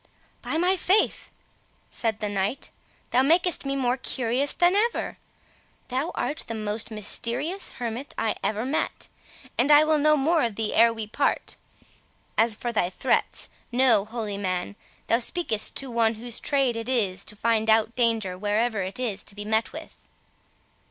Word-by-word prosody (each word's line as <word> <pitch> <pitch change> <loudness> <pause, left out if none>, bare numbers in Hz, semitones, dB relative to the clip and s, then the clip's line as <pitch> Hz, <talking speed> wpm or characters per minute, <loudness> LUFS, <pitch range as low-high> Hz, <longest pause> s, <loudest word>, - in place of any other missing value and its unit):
"By - - -2
my 365 +3 +2
faith," 385 +4 +1 0.6
said 220 -2 -2
the 210 - -1
knight, 205 +6 -2 0.4
"thou 255 - +4
makest 335 +2 +3
me 275 - -1
more 255 -2 0
curious 260 +2 0
than 350 +1 +3
ever! 460 +3 -1 0.7
Thou 265 +6 -1
art 300 - -3
the 230 - -4
most 215 0 -3
mysterious 240 - 0
hermit 245 +3 -5
I 220 - 0
ever 215 +2 -1
met; 285 +4 -2 0.5
and 255 +4 +3
I 295 0 +8
will 310 -1 +2
know 305 +1 +4
more 315 +4 +2
of 230 -3 -1
thee 220 0 -2
ere 230 +1 +5
we 225 -1 -5
part. 245 +7 -1 0.8
As 225 -1 +3
for 240 +2 -4
thy 180 -6 +1
threats, 185 - -1 0.2
know, 245 -4 +4
holy 215 -3 -4
man, 185 0 -3 0.3
thou 230 - +2
speakest 235 -4 +1
to 270 -2 -1
one 230 -1 +2
whose 235 +1 -4
trade 270 -4 +2
it 230 +2 -5
is 195 -7 +1
to 210 - -5
find 225 0 +1
out 220 +1 +3
danger 225 -6 +1
wherever 215 +1 0
it 190 +6 -4
is 215 -6 -2
to 200 - -6
be 205 0 -7
met 220 +1 +1
with." - - -10
230 Hz, 165 wpm, -25 LUFS, 215-275 Hz, 0.8 s, I